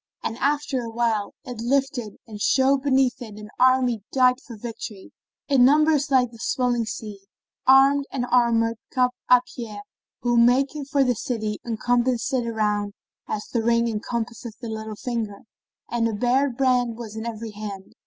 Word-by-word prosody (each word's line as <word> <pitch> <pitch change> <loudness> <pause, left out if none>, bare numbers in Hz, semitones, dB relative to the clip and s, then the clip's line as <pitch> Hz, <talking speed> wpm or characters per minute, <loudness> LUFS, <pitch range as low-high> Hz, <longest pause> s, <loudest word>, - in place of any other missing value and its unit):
And 225 - -2
after 285 -2 0
a 230 - -5
while 225 -3 -1
it 245 -5 -7
lifted 255 -3 -1
and 210 -2 -9
showed 265 +3 +3
beneath 265 -3 +2
it 215 -3 -8
an 210 0 -10
army 255 -3 +3
dight 255 0 +3
for 235 -7 -11
victory, 215 -3 -8 0.4
in 275 -4 +4
numbers 300 +2 +4
like 255 -3 +3
the 230 - -14
swelling 245 -1 0
sea, 205 -3 -7 0.4
armed 275 +2 +6
and 250 -3 -2
armoured 230 -2 +3
cap 250 -1 +2 0.2
а 250 -1 +7
pie 215 -4 -6 0.4
who, 240 -1 +1
making 270 +5 +3
for 280 0 +2
the 250 -1 +2
city, 215 -2 -3
encompassed 240 +2 0
it 245 -3 0
around 210 -2 -1 0.3
as 210 - -3
the 235 - +1
ring 235 +1 +2
encompasseth 230 +1 -4
the 235 - -6
little 220 -1 -5
finger;[FN#21] 220 -3 -4 0.5
and 235 -1 +1
a 225 - -2
bared 245 +3 +1
brand 250 -3 +2
was 225 -3 -8
in 220 +1 -5
every 225 -1 -5
hand. 205 -2 -8
240 Hz, 165 wpm, -24 LUFS, 220-260 Hz, 0.5 s, а